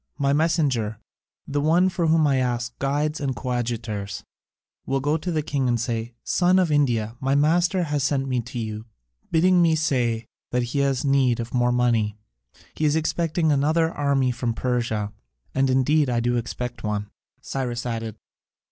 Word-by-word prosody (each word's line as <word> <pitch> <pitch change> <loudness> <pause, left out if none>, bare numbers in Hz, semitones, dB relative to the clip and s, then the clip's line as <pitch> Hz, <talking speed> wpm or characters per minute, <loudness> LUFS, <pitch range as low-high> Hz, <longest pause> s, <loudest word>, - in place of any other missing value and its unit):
My 140 -2 +1
messenger 140 -9 +1 0.5
the 145 0 -1
one 170 +5 +4
for 180 -3 0
whom 160 -1 +4
I 140 -2 +3
ask 120 -1 -1
guides 145 +3 0
and 135 -3 -2
coadjutors 115 -6 -3 0.6
will 135 0 +1
go 145 +3 +1
to 175 +3 -4
the 155 -2 0
king 140 -3 -1
and 120 -1 +1
say: 115 0 -3
'Son 180 +1 +3
of 180 -4 +2
India, 120 -7 +1
my 135 0 +1
master 175 +5 +3
has 150 -3 -1
sent 135 -1 0
me 130 -2 0
to 120 +2 -8
you, 110 -1 -4 0.4
bidding 180 +2 +4
me 165 -2 +4
say 120 -7 0 0.2
that 125 0 0
he 120 +4 -2
has 140 0 +1
need 135 -4 +3
of 115 0 -5
more 125 -1 +2
money. 115 -4 +1 0.6
He 155 - -1
is 150 0 +3
expecting 160 0 +1
another 155 +4 +2
army 140 -4 +1
from 120 -1 -2
Persia,' 115 -5 -1 0.4
and 135 0 +2
indeed 135 +3 +3
I 120 -1 +1
do 120 +1 +1
expect 120 +1 -4
one," 105 -1 -3 0.3
Cyrus 125 -3 -4
added. 115 -3 -3
130 Hz, 170 wpm, -24 LUFS, 120-150 Hz, 0.6 s, one